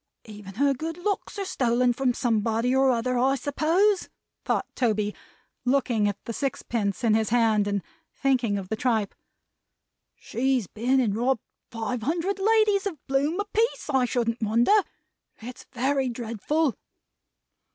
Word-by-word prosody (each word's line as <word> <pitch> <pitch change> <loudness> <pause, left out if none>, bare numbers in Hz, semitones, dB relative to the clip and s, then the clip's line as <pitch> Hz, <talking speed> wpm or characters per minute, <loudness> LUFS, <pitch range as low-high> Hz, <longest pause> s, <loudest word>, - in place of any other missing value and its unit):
"Even 205 -3 -10
her 280 +4 +3
good 320 +5 -5
looks 405 +3 -3
are 395 - -2
stolen 245 -7 +1
from 260 +1 +1
somebody 230 +1 +1
or 265 0 +4
other 250 0 +1
I 265 +2 +3
suppose," 325 - +1 0.3
thought - - 0
Toby, 215 -4 0 0.5
looking 245 -5 +2
at 205 -1 -2
the 230 - -4
sixpence 230 -6 -2
in 225 -2 +4
his 220 -1 +1
hand, 220 -3 +3
and 200 -2 -1 0.3
thinking 250 -7 +1
of 190 -2 -6
the 220 - -1
tripe. 220 -3 0 1.0
"She's 255 -2 -1
been 245 +8 0
and 220 -6 +1
robbed 245 +1 0 0.3
five 230 +1 -3
hundred 340 - -1
ladies 420 -1 +3
of 380 - -4
a - - -37
bloom 285 +7 0
a 410 - -1
piece, 445 -6 -1
I 265 -2 +3
shouldn't 235 -2 -1
wonder. 230 - +3 0.7
It's 245 +3 -10
very 265 +1 0
dreadful!" 240 +5 -1
250 Hz, 150 wpm, -26 LUFS, 225-285 Hz, 1.0 s, or